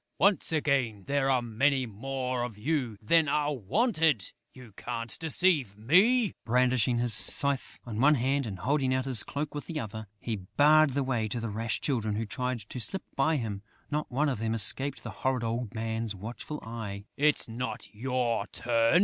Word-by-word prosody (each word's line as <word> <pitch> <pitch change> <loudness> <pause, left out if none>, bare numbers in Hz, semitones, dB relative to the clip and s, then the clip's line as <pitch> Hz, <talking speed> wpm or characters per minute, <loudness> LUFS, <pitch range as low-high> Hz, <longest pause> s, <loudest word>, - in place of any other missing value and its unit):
Once 200 -2 +3
again, 135 -9 0
there 140 -1 +1
are 130 -2 +2
many 130 +4 +1
more 125 +3 -3
of 120 -4 -4
you 125 -2 -1
than 160 +7 +4
are 150 +1 +1
wanted!... 155 - +1 0.2
You 125 -5 -14
can't 115 0 -4
deceive 160 - +2
me!" 195 - +4
Brandishing 125 0 +2
his 120 -1 +1
scythe 140 +5 +2
in 115 -2 -3
one 150 +2 +6
hand 135 +1 0
and 100 -3 -5
holding 130 +6 +1
out 130 0 -1
his 130 -5 +1
cloak 145 +1 -4
with 145 - -6
the 160 -3 -3
other, 110 -2 -6
he 115 -2 -3
barred 145 +8 +4
the 140 - +1
way 120 -4 -1
to 115 +3 -3
the 115 -2 -4
rash 115 +2 -2
Children 110 -7 -1
who 110 +2 -2
tried 125 +2 -3
to 110 +5 -8
slip 190 - -2
by 155 +4 +2
him. 110 -7 -3 0.3
Not 150 +1 -1
one 145 +5 +1
of 130 -6 -1
them 115 0 -1
escaped 135 +6 +1
the - - -6
horrid 130 -2 -1
old 115 -1 -3
man's 110 -1 -2
watchful 120 +9 -7
eye: 105 -3 -6
"It's 150 +1 +3
not 115 0 -5
your 120 -2 -1
turn!" 115 +6 +2
125 Hz, 185 wpm, -29 LUFS, 115-145 Hz, 0.3 s, one